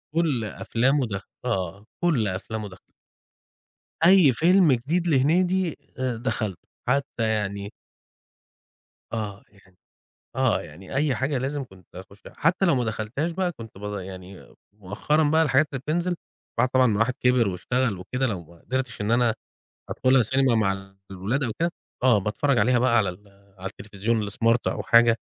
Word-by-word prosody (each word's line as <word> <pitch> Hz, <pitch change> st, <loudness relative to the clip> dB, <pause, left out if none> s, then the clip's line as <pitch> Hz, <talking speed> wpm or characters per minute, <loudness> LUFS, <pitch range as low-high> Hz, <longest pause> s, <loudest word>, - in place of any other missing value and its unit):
كل 155 Hz, -8 st, +1 dB
أفلامه 130 Hz, +6 st, 0 dB
دخلَتها 100 Hz, -2 st, -5 dB, 0.2 s
آه، 100 Hz, -4 st, -2 dB, 0.2 s
كل 150 Hz, -11 st, +2 dB
أفلامه 105 Hz, +2 st, -4 dB
دخل 90 Hz, -, -14 dB, 1.3 s
أي 180 Hz, -6 st, +7 dB
فيلم 170 Hz, +5 st, +4 dB
جديد 160 Hz, +9 st, -1 dB
لهنيدي 175 Hz, +4 st, +2 dB, 0.2 s
آآ، 125 Hz, -3 st, -1 dB
دخلَته 110 Hz, -6 st, -3 dB, 0.2 s
حتى 130 Hz, -3 st, 0 dB
يعني 100 Hz, -1 st, -2 dB, 1.4 s
آه 105 Hz, -3 st, -4 dB
يعني 100 Hz, -2 st, -23 dB, 0.6 s
آه -, -, +2 dB
يعني 95 Hz, -, -10 dB
أي 140 Hz, -3 st, +2 dB
حاجة 130 Hz, +3 st, -1 dB
لازم 135 Hz, +2 st, -2 dB
كنت 95 Hz, -5 st, -19 dB
أخُشها. 95 Hz, +2 st, -12 dB
حتى 175 Hz, +4 st, +2 dB
لو 170 Hz, -, +4 dB
ما 125 Hz, -, +1 dB
دخلتهاش 110 Hz, +9 st, -2 dB
بقى 180 Hz, 0 st, -1 dB
كنت 115 Hz, -, -11 dB
ب 100 Hz, -, -12 dB, 0.2 s
يعني 95 Hz, 0 st, -10 dB, 0.2 s
مؤخرًا 105 Hz, +10 st, 0 dB
بقى 160 Hz, +2 st, +4 dB
الحاجات 145 Hz, 0 st, +3 dB
اللي 135 Hz, -, -3 dB
بتنزِل 170 Hz, +6 st, -1 dB, 0.4 s
بعد 125 Hz, -, +3 dB
طبعًا 130 Hz, 0 st, +4 dB
ما 110 Hz, -, +2 dB
الواحد 115 Hz, +5 st, +1 dB
كِبر 125 Hz, -2 st, +3 dB
واشتغل 105 Hz, +4 st, -1 dB
وكده، 125 Hz, +8 st, -2 dB
لو 95 Hz, -7 st, -4 dB
ما 85 Hz, +1 st, -19 dB
قدرتش 130 Hz, -4 st, -3 dB
إن 105 Hz, -, -1 dB
أنا 120 Hz, -1 st, +3 dB, 0.6 s
أدخّلها 130 Hz, 0 st, +3 dB
سينما 130 Hz, +2 st, +2 dB
مع 95 Hz, -3 st, -1 dB, 0.2 s
الولاد 100 Hz, +9 st, -2 dB
أو 115 Hz, -, -2 dB
كده، 170 Hz, 0 st, +1 dB, 0.3 s
آه 125 Hz, -4 st, +5 dB
باتفرّج 110 Hz, +7 st, 0 dB
عليها 120 Hz, +4 st, +3 dB
بقى 120 Hz, -1 st, +3 dB
على 100 Hz, -, +2 dB
ال 95 Hz, +3 st, -9 dB, 0.3 s
على 95 Hz, +1 st, -5 dB
التلفزيون 105 Hz, +2 st, -2 dB
الsmart 115 Hz, +3 st, +3 dB
أو -, -, -1 dB
حاجة، 115 Hz, 0 st, +5 dB
120 Hz, 155 wpm, -25 LUFS, 100-140 Hz, 1.4 s, أي